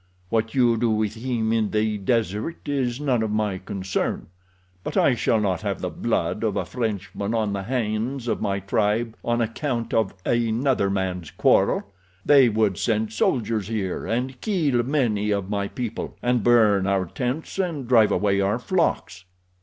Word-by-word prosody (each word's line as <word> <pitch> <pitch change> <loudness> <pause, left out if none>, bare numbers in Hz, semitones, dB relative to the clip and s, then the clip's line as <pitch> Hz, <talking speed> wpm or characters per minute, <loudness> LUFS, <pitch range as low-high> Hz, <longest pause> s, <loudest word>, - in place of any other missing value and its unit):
What 115 +2 0
you 120 -3 +4
do 115 +1 +1
with 110 -1 0
him 115 -1 -1
in 110 -2 +1
the 110 -1 0
desert 110 - -1
is 130 -3 -1
none 130 -6 +1
of 110 - -1
my 105 -3 -1
concern, 95 -3 -3 0.5
but - - -4
I 135 - +4
shall 115 -1 +1
not 95 -5 0
have - - -2
the - - -3
blood - - -1
of - - 0
a - - -1
Frenchman 105 -2 -3
on 110 -3 0
the 100 - -2
hands 120 +3 -2
of 110 - -1
my 100 -1 0
tribe 105 +3 0
on 120 0 0
account 115 0 -2
of 110 -3 +1
another 120 -1 +1
man's 95 -4 -2
quarrel—they 95 +8 +2
would 105 -4 +1
send 110 -1 0
soldiers 110 -2 0
here 100 -6 -3
and 125 +4 -2
kill 155 - +1
many 120 -6 0
of 100 -1 -1
my 100 -1 -1
people, 115 0 -5
and 120 -2 +1
burn 105 -5 +4
our 95 -1 +1
tents 130 - -4
and 165 -9 -2
drive 115 -4 +5
away 100 -1 +2
our 100 +3 +1
flocks." 125 - -1
110 Hz, 165 wpm, -24 LUFS, 100-120 Hz, 0.5 s, drive